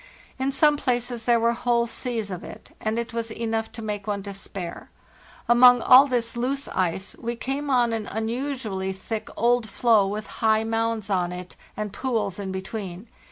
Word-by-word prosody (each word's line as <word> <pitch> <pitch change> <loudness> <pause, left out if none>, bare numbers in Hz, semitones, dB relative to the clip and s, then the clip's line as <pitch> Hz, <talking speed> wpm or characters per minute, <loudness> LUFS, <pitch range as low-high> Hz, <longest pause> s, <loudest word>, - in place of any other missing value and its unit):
In 265 +1 0
some 295 +2 +4
places 245 -3 -1
there 235 -1 +4
were 230 +1 +3
whole 235 0 +1
seas 230 -3 -4
of 180 - -5
it, - - -11
and 220 +1 -1
it 235 0 -3
was 230 -1 -2
enough 225 0 -2
to 225 - -7
make 210 -2 -4
one 200 -2 -2
despair. 195 -3 -6 0.6
Among 245 0 +7
all 260 +3 +8
this 240 -3 -1
loose 270 +4 -1
ice 185 +2 -1
we 235 0 -3
came 275 +4 -3
on 240 -3 +3
an 220 -2 -3
un 220 +1 -2
usually 230 -7 -3
thick 210 +3 -5
old 235 0 +2
floe, 220 -3 +3
with 210 +1 -4 0.2
high 220 -1 +4
mounds 225 -2 -1
on 180 -2 +1
it 180 0 -8 0.2
and 210 -2 -4
pools 210 -5 -2
in 195 -2 -4
between. 190 +1 -6
225 Hz, 180 wpm, -25 LUFS, 200-245 Hz, 0.6 s, all